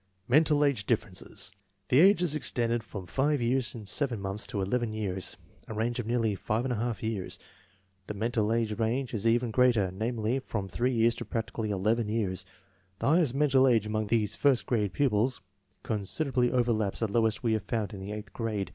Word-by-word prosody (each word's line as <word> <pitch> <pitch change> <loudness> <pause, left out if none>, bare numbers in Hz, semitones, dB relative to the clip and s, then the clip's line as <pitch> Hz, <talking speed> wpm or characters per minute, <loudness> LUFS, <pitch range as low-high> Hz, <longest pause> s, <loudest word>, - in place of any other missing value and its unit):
Mental 150 +2 +4
age 125 -8 0
differences. - - -2 0.4
The 130 - +5
ages 180 -3 +5
extended 120 -6 0
from 95 -3 -7
5 140 - +1
years 125 +1 0
7 120 +3 0
months 100 +2 -3
to 100 - -3
11 110 +3 -1
years, 95 -4 -4 0.3
a 110 - -6
range 120 +3 -1
of 115 - -3
nearly 115 -3 +1
5| 115 +2 -2
years. 110 -4 -3 0.7
The 105 - -5
mental 110 0 0
age 115 -1 0
range 120 +4 -1
is 110 0 0
even 120 0 +2
greater; 115 -6 +3
namely, 110 +4 -1
from 105 -6 -4
3 120 +7 0
years 115 -1 +3
to - - -7
practically 115 -1 -3
11 105 +3 0
years. 95 -4 -2 0.5
The - - 0
highest 155 -5 +3
mental 135 -2 +4
age 115 -4 +3
among 110 0 -1
these 105 -1 +1
first 140 -4 +2
grade 105 -5 0
pupils 125 -2 +1 0.4
considerably 125 +4 0
overlaps 120 -5 0
the 115 - +2
lowest 110 +2 +1
we 115 -2 +2
have 110 - 0
found 105 +1 -3
in 100 - -7
the 95 +2 -6
eighth 105 0 -7
grade. 110 -4 -2
115 Hz, 175 wpm, -29 LUFS, 105-125 Hz, 0.7 s, The